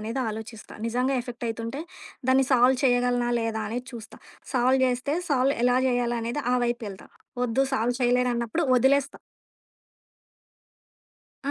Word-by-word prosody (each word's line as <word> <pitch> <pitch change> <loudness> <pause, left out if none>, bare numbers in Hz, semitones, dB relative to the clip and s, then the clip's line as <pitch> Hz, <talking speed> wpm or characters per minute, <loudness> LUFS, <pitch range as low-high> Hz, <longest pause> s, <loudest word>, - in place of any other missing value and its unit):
అనేదాలోచిస్తా. 220 -1 -5
నిజంగా 250 +3 0
ఎఫెక్టయితుంటే 235 +2 -5 0.5
దాన్ని 265 +1 +5
సాల్వ్ 250 +1 +5
చేయగలనా? 245 -1 +2
లేదా? 225 -1 -2
అనేది 245 +3 -4
చూస్తా. 230 -2 -10 0.4
సాల్వ్ 255 +1 +3
చేస్తే 255 +4 -1 0.2
సాల్వ్ 270 +1 +2
ఎలా 250 0 +4
చేయాలి 240 -1 0
అనేది 240 +5 -3
ఆ - - +3
వైపెళ్తా. 235 -5 -4 0.4
ఒద్దు 245 +3 +1
సాల్వ్ 240 +1 0
చేయలేరున్నప్పుడు 245 +4 +1
ఒదిలేస్తా. 275 +2 +2 2.3
ఆ! - - +2
245 Hz, 115 wpm, -26 LUFS, 230-260 Hz, 2.3 s, దాన్ని